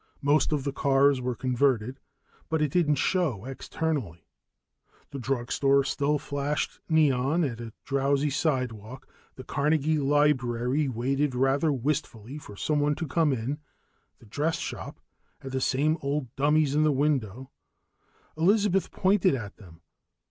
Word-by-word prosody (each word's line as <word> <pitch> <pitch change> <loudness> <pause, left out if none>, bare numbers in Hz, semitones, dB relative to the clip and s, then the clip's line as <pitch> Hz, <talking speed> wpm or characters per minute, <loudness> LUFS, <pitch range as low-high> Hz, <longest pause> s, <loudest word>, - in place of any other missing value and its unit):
Most 145 +3 +3
of 145 -3 0
the 140 -1 -3
cars 135 -1 +3
were 125 -1 -2
converted, 130 0 0 0.5
but 160 0 0
it 150 -2 0
didn't 155 -3 +2
show 145 - 0
externally. 135 - -4 0.9
The 140 - -6
drug 125 -1 -2
store 140 0 +3
still 140 +2 0
flashed 145 0 -3
neon 150 0 +2
at 120 -5 -3
a 115 -1 -7
drowsy 140 +1 +1
sidewalk, 130 -5 -2 0.3
the 130 - -9
Carnegie 155 +2 +1
library 135 -2 +1
waited 135 +3 -1
rather 135 +4 +2
wistfully 135 -2 -3
for 105 - -12
someone 150 +5 0
to 165 - -4
come 155 +1 +2
in, 130 +4 -3 0.6
the - - -19
dress 150 +9 -1
shop - - -6 0.4
had 135 - -7
the 130 0 -2
same 150 +6 +1
old 140 -3 -3
dummies 145 0 +2
in 150 - +2
the 155 0 +3
window. 130 -4 -1 0.8
Elizabeth 195 +3 +2
pointed 190 -4 +2
at 105 -6 -7
them. 85 -5 -16
140 Hz, 140 wpm, -27 LUFS, 130-150 Hz, 0.9 s, Most